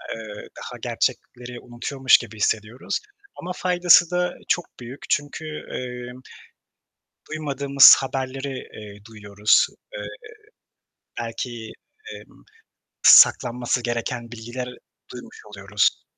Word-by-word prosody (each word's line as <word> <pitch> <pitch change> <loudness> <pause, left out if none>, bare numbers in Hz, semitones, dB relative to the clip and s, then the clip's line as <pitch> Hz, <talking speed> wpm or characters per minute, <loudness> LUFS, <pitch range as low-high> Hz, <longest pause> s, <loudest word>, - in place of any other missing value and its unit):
eee, 110 -2 -10
daha - - -8
gerçekleri 120 0 -3
unutuyormuş 130 +2 +2
gibi 115 -2 -10
hissediyoruz 110 +3 -2 0.4
ama 180 - -6
faydası 175 -1 +4
da 180 0 0
çok 175 - 0
büyük. 125 +3 -10
Çünkü, 145 +2 -2 0.2
emm, 125 0 -7 1.1
duymadığımız 140 -3 +6
haberleri, 135 0 -4 0.2
eee, 105 -1 -11
duyuyoruz. 105 -1 +1 0.3
Eee, - - -6 1.1
belki, 115 -1 -6 0.4
emm, - - -15 0.6
saklanması 125 0 +5
gereken 120 0 -4
bilgiler 120 +2 -6 0.4
duymuş - - -11
oluyoruz. 105 0 -1
125 Hz, 95 wpm, -23 LUFS, 115-135 Hz, 1.1 s, duymadığımız